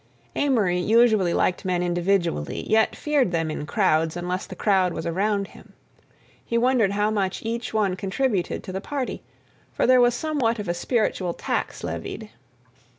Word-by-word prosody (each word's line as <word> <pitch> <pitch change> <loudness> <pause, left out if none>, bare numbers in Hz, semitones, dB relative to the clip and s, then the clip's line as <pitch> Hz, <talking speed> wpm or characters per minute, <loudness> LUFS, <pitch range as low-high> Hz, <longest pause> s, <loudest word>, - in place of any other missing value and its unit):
Amory 215 -11 +2
usually 215 -2 +4
liked 180 - 0
men 180 -1 0
individually, 175 - -1
yet 220 0 +3
feared 290 -7 +1
them 165 -2 -1
in 150 -1 -5
crowds 165 -4 +1
unless 180 +1 -3
the - - -8
crowd 190 -4 +2
was - - -5
around 200 +3 0
him. - - -16 0.7
He 235 - -1
wondered 235 -4 +2
how 210 +1 +1
much 195 -3 -1
each 235 +1 -3
one 205 -4 +1
contributed 195 0 -1
to - - -7
the 190 +1 -4
party, 275 +1 -4 0.5
for - - 0
there 255 0 +6
was 245 0 +4
somewhat 280 -7 0
of 205 -2 -5
a 175 - 0
spiritual 185 -2 -1
tax - - -3
levied. 220 -2 -5
200 Hz, 160 wpm, -24 LUFS, 180-235 Hz, 0.7 s, there